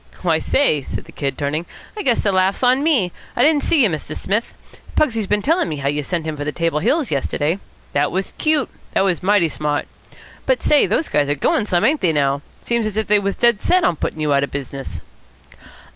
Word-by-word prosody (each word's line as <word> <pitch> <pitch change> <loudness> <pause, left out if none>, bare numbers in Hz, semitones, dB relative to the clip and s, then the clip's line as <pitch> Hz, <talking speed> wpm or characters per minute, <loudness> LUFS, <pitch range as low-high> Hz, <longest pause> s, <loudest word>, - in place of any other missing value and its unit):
"Why, 165 -3 +2
say," 160 - +2
said - - -6
the - - -14
Kid, 140 -2 -3
turning, 150 +4 -2 0.3
"I 425 - -4
guess 245 - +2
the 205 - +1
laugh's 190 +4 +1
on 255 +2 +4
me. 270 - +2 0.2
I 245 - +3
didn't 300 0 +4
see 300 -3 +3
you, - - +5
Mr. 155 -1 -5
Smith. 210 +4 -1 0.4
Pugsy's 225 -8 +1
been 210 +1 +1
tellin' 325 - +2
me 155 - -3
how 140 -1 -1
you 145 +1 -1
sent 165 +2 -3
him 155 -1 -3
for 145 - -5
the 150 - -2
Table 165 -1 -1
Hills 290 - +1
yesterday. 150 +4 -1 0.3
That 145 +1 +1
was 190 +2 -3
cute. 310 -3 +1 0.3
It - - +4
was 190 -3 +1
mighty 195 -2 +3
smart. 150 -1 -2 0.6
But - - +1
say, 295 - +4
those 320 - 0
guys 145 -1 +1
are 145 - +1
goin' 205 +8 +1
some, 180 +1 +2
ain't 295 +5 +2
they 170 -4 +2
now! 140 -1 +1 0.2
Seems 235 -2 0
as 215 -1 -5
if 220 - +1
they 210 +1 +3
was 200 0 -2
dead 235 -3 +2
set 365 0 +3
on 170 - +2
puttin' 155 - -4
you 150 -1 +1
out 140 0 +3
of 140 - -2
business." 140 0 -6
185 Hz, 230 wpm, -20 LUFS, 150-235 Hz, 0.6 s, you